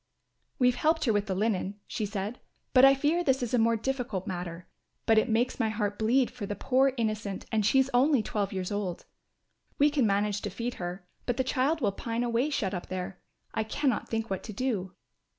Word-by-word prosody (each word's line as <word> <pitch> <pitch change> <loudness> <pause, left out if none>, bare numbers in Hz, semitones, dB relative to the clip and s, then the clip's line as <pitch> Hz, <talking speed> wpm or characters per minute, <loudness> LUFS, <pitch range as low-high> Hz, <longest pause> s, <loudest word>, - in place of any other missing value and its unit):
"We 250 -2 +5
helped 315 +5 +1
her 225 - +3
with 205 0 0
the 190 - -1
linen," 205 -1 -1
she 210 - -3
said, 205 +3 -4 0.3
"but 255 0 +7
I 270 0 +8
fear 300 +6 +1
this 265 -4 +2
is 240 - -3
a 245 - +4
more 230 +1 +3
difficult 235 -5 -2
matter; 180 -3 -5 0.4
but 225 -1 +5
it 225 - 0
makes 235 +4 +1
my 225 -2 +2
heart 210 -2 -2
bleed 240 +4 +3
for 230 -5 -6
the 205 - -3
poor 265 +5 +3
innocent 215 -4 -2
and 220 -2 +2
she 265 +6 +4
only 260 -1 +4
twelve 205 -2 -2
years 185 -1 -3
old. 200 -4 -3 0.7
We 290 +1 +4
can 275 -6 +2
manage 205 0 +1
to - - -3
feed 240 +1 -4
her, 180 +1 -5 0.2
but 245 -1 0
the 260 - +2
child 275 +4 +1
will 205 -5 +2
pine 230 +4 -3
away 240 +4 +1
shut 205 -9 -1
up 180 - -4
there. 185 0 -5 0.3
I 220 - 0
cannot 255 +2 -1
think 225 0 -1
what 190 - -1
to 215 - -7
do." 200 -6 -2
225 Hz, 210 wpm, -29 LUFS, 200-255 Hz, 0.7 s, I